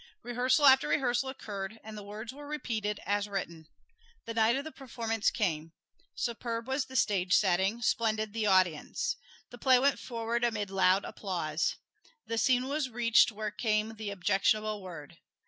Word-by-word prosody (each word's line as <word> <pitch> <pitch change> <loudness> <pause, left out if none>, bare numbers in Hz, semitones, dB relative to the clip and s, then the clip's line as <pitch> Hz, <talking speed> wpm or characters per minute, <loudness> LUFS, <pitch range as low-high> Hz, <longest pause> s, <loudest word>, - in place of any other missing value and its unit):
Rehearsal 250 +4 +2
after 265 -1 +7
rehearsal 265 -1 +1
occurred, 210 -4 -6
and 220 0 -9
the 210 - -7
words 210 +4 -7
were 290 +1 -10
repeated 220 -8 -3
as 205 +1 0
written. 170 -5 -5 0.6
The 230 - -4
night 225 +1 +3
of 275 - -2
the 315 - -7
performance 230 -5 -1
came. 165 -6 -2 0.4
Superb 230 -1 -3
was 265 +1 0
the 260 - -12
stage 190 -6 +2
setting, 195 +4 +2
splendid 220 -2 0
the 220 -2 0
audience. 190 - +2 0.4
The 245 - -11
play 260 0 +5
went 275 +2 +2
forward 235 0 -3
amid 210 -4 -1
loud 190 0 +3
applause. 170 -5 -2 0.5
The 230 0 -2
scene 255 +1 +2
was 285 -1 -1
reached 235 0 +4
where 215 0 -4
came 215 +1 0
the 215 -1 -6
objectionable 205 +2 +1
word. 170 -3 -10
220 Hz, 160 wpm, -30 LUFS, 200-245 Hz, 0.6 s, after